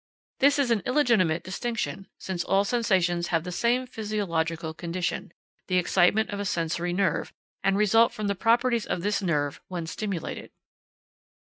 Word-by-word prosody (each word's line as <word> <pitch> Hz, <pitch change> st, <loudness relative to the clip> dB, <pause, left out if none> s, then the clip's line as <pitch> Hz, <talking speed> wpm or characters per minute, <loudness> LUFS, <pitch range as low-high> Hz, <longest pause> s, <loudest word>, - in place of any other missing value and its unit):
This 280 Hz, +1 st, +5 dB
is 275 Hz, -4 st, +1 dB
an 225 Hz, -3 st, +2 dB
illegitimate 230 Hz, -, +2 dB
distinction, 200 Hz, 0 st, -3 dB
since 180 Hz, -2 st, -3 dB
all 195 Hz, +1 st, +2 dB
sensations 185 Hz, -7 st, +1 dB
have 165 Hz, -2 st, 0 dB
the 180 Hz, -, -5 dB
same 240 Hz, +7 st, +1 dB
physiological 170 Hz, -9 st, -2 dB
condition, 170 Hz, +1 st, -3 dB, 0.4 s
the 185 Hz, -, +1 dB
excitement 185 Hz, +4 st, +3 dB
of 200 Hz, -, -4 dB
a -, -, -1 dB
sensory 170 Hz, 0 st, -1 dB
nerve, 185 Hz, -3 st, 0 dB, 0.3 s
and 195 Hz, 0 st, +2 dB
result 225 Hz, +3 st, +4 dB
from 215 Hz, -, -5 dB
the 200 Hz, -, +1 dB
properties 235 Hz, +3 st, +2 dB
of 175 Hz, -, -2 dB
this 205 Hz, 0 st, 0 dB
nerve 145 Hz, -6 st, -1 dB
when 175 Hz, -3 st, -4 dB
stimulated. 190 Hz, 0 st, -4 dB
195 Hz, 150 wpm, -26 LUFS, 175-225 Hz, 0.4 s, This